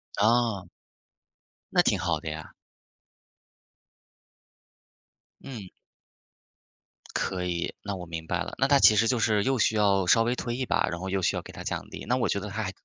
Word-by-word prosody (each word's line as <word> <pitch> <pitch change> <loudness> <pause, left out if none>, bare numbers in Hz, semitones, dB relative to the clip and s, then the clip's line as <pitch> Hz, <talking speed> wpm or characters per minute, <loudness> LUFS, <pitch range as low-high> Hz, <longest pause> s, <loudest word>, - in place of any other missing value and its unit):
啊。 110 -4 +2 1.0
那 - - +5
挺 - - +2
好 85 -3 0
的 80 - -5
呀。 80 0 -7 2.9
嗯。 110 -9 -8 1.5
可 90 -1 -1
以。 85 -1 -2
那 100 -1 -3
我 90 -1 -7
明 80 -1 -6
白 90 0 -1
了， - - -5
那 135 - +2
她 140 -1 +5
其 110 - +7
实 115 +2 +3
就 125 -1 +1
是 105 -2 +2
又 135 -1 +1
需 110 - +2
要 100 -3 +3
稍 115 +4 +5
微 120 +2 0
推 120 -1 -3
一 130 - -2
把， 100 -3 +1
然 85 0 -4
后 95 +1 -5
又 95 0 -1
需 - - +1
要 - - -2
给 - - -12
她 - - -9
奖 - - -3
励， - - -8
那 125 - +2
我 - - 0
觉 100 - 0
得 105 +1 -6
她 110 +3 -3
还 95 - -3
100 Hz, 200 characters per minute, -27 LUFS, 90-115 Hz, 2.9 s, 其